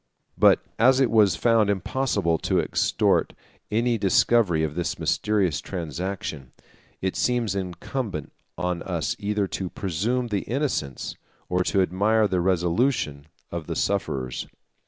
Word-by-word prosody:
155 - - -18 0.4
But - - +2
as 130 +2 +6
it 130 -3 +3
was 105 -6 +5
found 115 0 +3
impossible 100 -4 0
to - - +1
extort - - +1 0.4
any 115 +2 +1
discovery 100 -3 +3
of 75 -2 -1
this 85 +2 -2
mysterious 100 -8 +1
transaction, 85 -5 -5 0.5
it 95 - -1
seems 120 -5 +1
incumbent 95 - -4 0.3
on 90 0 -2
us - - -2
either 105 0 0
to 95 -2 -3
presume 110 +9 -1
the 100 -3 0
innocence, 120 - -2 0.3
or 90 0 +1
to 95 - +3
admire 105 +5 +2
the 90 -3 0
resolution, 85 - 0 0.2
of 85 -3 -5
the - - -3
sufferers. 65 -2 -2
95 Hz, 135 wpm, -25 LUFS, 85-110 Hz, 0.5 s, as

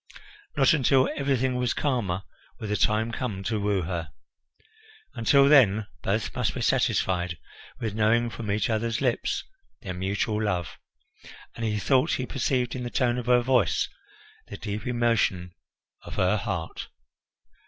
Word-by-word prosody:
Not 135 0 +5
until 135 -3 +3
everything 130 -2 0
was 125 -1 0
calmer 105 -10 -1 0.4
would 105 -2 -5
the - - +1
time 110 +2 +1
come 110 -5 -4
to 110 +1 -1
woo 100 -2 0
her. 85 -2 -4 1.0
Until 140 +4 +4
then 110 -8 +5 0.2
both 100 +3 -1
must - - -1
be - - -3
satisfied 90 -2 +1 0.4
with 110 -3 -3
knowing 115 +2 +2
from 110 -1 -6
each 100 -1 +1
other's 115 0 -1
lips 270 - 0 0.4
their 95 - -4
mutual 100 +4 -1
love, 90 -7 -2 0.7
and 115 - -7
he 105 -1 -1
thought 130 +8 +2
he 130 - -1
perceived 125 -1 -1
in 130 - -4
the 120 - -4
tone 125 -1 +1
of 120 - -7
her 125 0 +5
voice 125 +1 +2 0.6
the - - -8
deep 105 0 -5
emotion 115 -7 +1 0.5
of - - -9
her - - +2
heart. - - -4
115 Hz, 150 wpm, -26 LUFS, 100-125 Hz, 1.0 s, Not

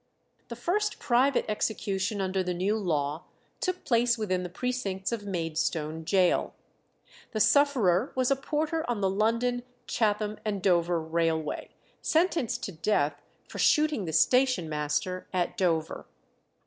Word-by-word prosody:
The 235 - -6
first 405 - -1
private 255 +2 +2
execution 205 -2 -1
under 190 0 0
the 180 -1 -2
new 190 +4 +1
law 155 -6 -1 0.3
took 370 -1 -2
place 235 0 +3
within 185 -4 -1
the 180 - -5
precincts 195 -2 -3
of 210 -3 -4
Maidstone 160 -3 -2
Gaol. 185 +1 +2 0.8
The 215 - -1
sufferer 225 -4 +3
was 255 0 +1
a - - +5
porter 310 +4 -1
on 230 -4 -1
the 190 - +2
London, 230 +4 +1 0.2
Chatham, 210 -1 0
and 210 -2 -2
Dover 175 -2 +3
railway, 160 -1 -1 0.3
sentenced 310 -8 +1
to - - -3
death 155 -4 0 0.3
for - - -8
shooting 305 - +3
the 160 - -4
station 255 - +3
master 150 +4 -2
at 180 -2 0
Dover. 165 -4 -1
200 Hz, 135 wpm, -28 LUFS, 175-245 Hz, 0.8 s, a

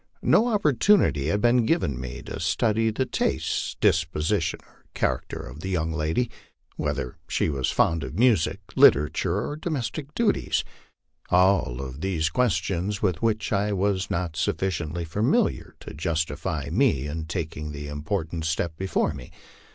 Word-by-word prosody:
No 230 - +4
op 210 -4 0
portunity 135 - +3
had 105 +5 +1
been 120 +1 +4
given 110 - 0
me 65 -2 -7
to - - -6
study 110 +7 +1
the 120 +4 -1
tastes, - - -1
disposition, 80 +3 +1
or - - -27
character - - -1
of 70 +3 -10
the 95 - -5
young 80 -3 -1
lady 80 +10 0 0.4
whether 60 - -3
she - - 0
was 70 -3 -1
fond 80 -3 +2
of 75 - -6
music, 115 -9 +3
literature, 80 +6 +4
or 145 - -4
domestic 150 -2 -4
duties. 230 -3 +1 0.7
All 80 -9 +2
these 85 0 -1
were - - -29
questions 100 -5 0
with 90 -5 +1
which 110 -2 0
I 105 +1 +1
was 95 -1 0
not 85 -2 -2
sufficiently 85 -1 -1
familiar 105 +8 0
to - - -9
justify 80 -2 -2
me 105 - +2
in 80 +2 -4
taking 75 -3 -4
the 75 0 -6
important 80 +2 -3
step 80 0 -1
before 95 +2 0
me. 65 -2 -10
85 Hz, 150 wpm, -25 LUFS, 80-105 Hz, 0.7 s, No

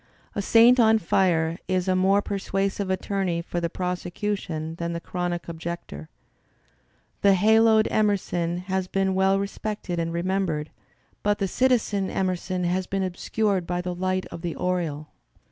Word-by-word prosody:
A 205 - -2
saint 235 +5 +6
on 225 -1 +6
fire 170 -3 +1
is 185 -1 0
a 185 - +2
more 195 +2 +3
persuasive 195 0 -2
attorney 190 -2 -1
for 175 +1 -4
the 170 - -1
prosecution 180 -2 -3
^ - - -20
than 170 0 -3
the 170 - -3
chronic 175 0 -3
objector. 165 - -6 1.1
The 200 -1 +5
haloed 220 +2 +5
Emerson 180 -5 0
has 190 0 -2
been 195 0 0
well 190 +1 +3
respected 200 -2 -3
and 165 0 -1
remembered, 170 -3 -1 0.5
but 205 0 +1
the 195 - -1
citizen 215 -4 +1
Emerson 185 -1 -2
has 180 +1 0
been 195 0 -1
obscured 190 0 -1
by 175 0 -1
the 180 0 -3
light 185 +1 -1
of 165 - -7
the 170 -1 -3
aureole. 165 -5 -2
185 Hz, 150 wpm, -25 LUFS, 175-200 Hz, 1.1 s, saint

